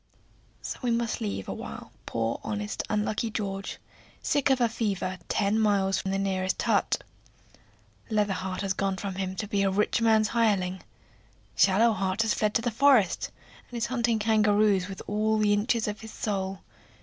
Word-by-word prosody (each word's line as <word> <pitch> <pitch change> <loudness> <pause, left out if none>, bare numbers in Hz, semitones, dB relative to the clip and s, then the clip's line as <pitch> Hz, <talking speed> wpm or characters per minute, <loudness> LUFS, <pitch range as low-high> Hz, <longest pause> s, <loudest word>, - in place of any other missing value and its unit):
So - - -5
we 245 - -1
must 235 0 0
leave 200 - -3
awhile - - -7 0.2
poor, 115 0 -1
honest, 210 0 -3
unlucky 215 +2 0
George, 195 -3 -4 0.5
sick 285 -1 +2
of 265 -1 +3
a 240 - +4
fever, 200 -5 -2
ten 205 +2 +1
miles 200 -3 +2
from 190 - -3
the 195 - 0
nearest 190 -1 -1
hut. - - +1 1.1
Leather 210 -2 +1
heart 185 0 -4
has 195 -1 0
gone 195 0 -1
from 195 0 -4
him 190 0 -3
to 210 - -4
be 200 -1 0
a 195 - +3
rich 210 +4 +1
man's 220 -2 +4
hireling. 195 -5 +1 0.7
Shallow 220 +4 +4
heart 190 +2 0
has 220 - +1
fled 210 -1 0
to 230 - +2
the 240 - 0
forest, 250 -4 +3 0.4
and 245 - -6
is 230 - 0
hunting 235 -2 +2
kangaroos 210 -3 +3
with 195 -1 -7
all 215 +1 +1
the 210 -1 +3
inches 220 +2 +1
of 210 0 -4
his 220 0 -9
soul. 195 -2 -3
210 Hz, 175 wpm, -27 LUFS, 195-220 Hz, 1.1 s, a